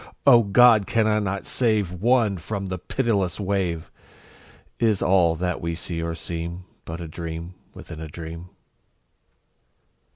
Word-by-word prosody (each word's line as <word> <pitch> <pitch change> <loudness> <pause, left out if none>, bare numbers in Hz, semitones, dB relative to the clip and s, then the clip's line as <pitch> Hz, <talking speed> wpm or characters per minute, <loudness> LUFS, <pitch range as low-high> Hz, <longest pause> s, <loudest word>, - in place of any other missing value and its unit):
O 125 -4 +8
God! 110 0 +5
can 115 -1 +2
I 110 0 +2
not 100 -1 -3
save 110 -7 0
One 110 0 +2
from 100 +3 -4
the 95 -1 -4
pitiless 100 -4 -1
wave? 95 -5 -2 0.9
Is 110 -4 +2
all 90 -3 +3
that 90 +1 -2
we 85 0 -2
see 85 0 -4
or 85 0 -3
seem 85 +1 -5
Is 90 - -9 0.2
but 80 +1 -6
a 85 - -6
dream 85 +2 -6 0.2
within 80 -2 -9
a 80 - -6
dream. 85 +2 -8
90 Hz, 150 wpm, -24 LUFS, 85-105 Hz, 0.9 s, O